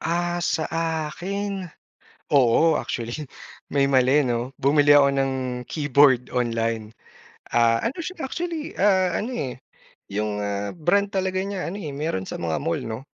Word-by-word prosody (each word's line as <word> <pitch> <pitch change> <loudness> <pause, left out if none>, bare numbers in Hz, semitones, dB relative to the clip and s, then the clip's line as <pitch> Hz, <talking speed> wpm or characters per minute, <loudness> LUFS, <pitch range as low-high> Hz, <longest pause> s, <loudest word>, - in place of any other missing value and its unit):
Ah, 175 +1 -1
sa 160 -2 0 0.5
akin, 195 +1 -4 0.6
oo 140 +4 +4
actually 120 +5 -4 0.5
may 140 -1 +3
mali 130 +2 +4
'no, 125 0 -2
bumili 145 +1 +5
ako 140 -1 +6
ng 135 0 +1 0.3
keyboard 140 -4 +3
online, 115 -2 -1 0.6
ah, 115 -1 +4
ano 245 - -2
siya 325 -7 -5
actually, 335 -1 -4
ah, 190 -3 +3
ano, 235 +5 -2
eh, 135 - -3 0.5
yung, 105 +1 -2
ah, 100 0 -2
brand 195 +5 +1
talaga 190 -1 -1
niya 195 -1 -4
ano, 200 +4 -5
eh, 155 - -4
mayroon 140 - -2
sa - - -5
mga 85 - -2
mall 165 +1 0
'no. 115 +1 -5
145 Hz, 145 wpm, -24 LUFS, 120-185 Hz, 0.6 s, ako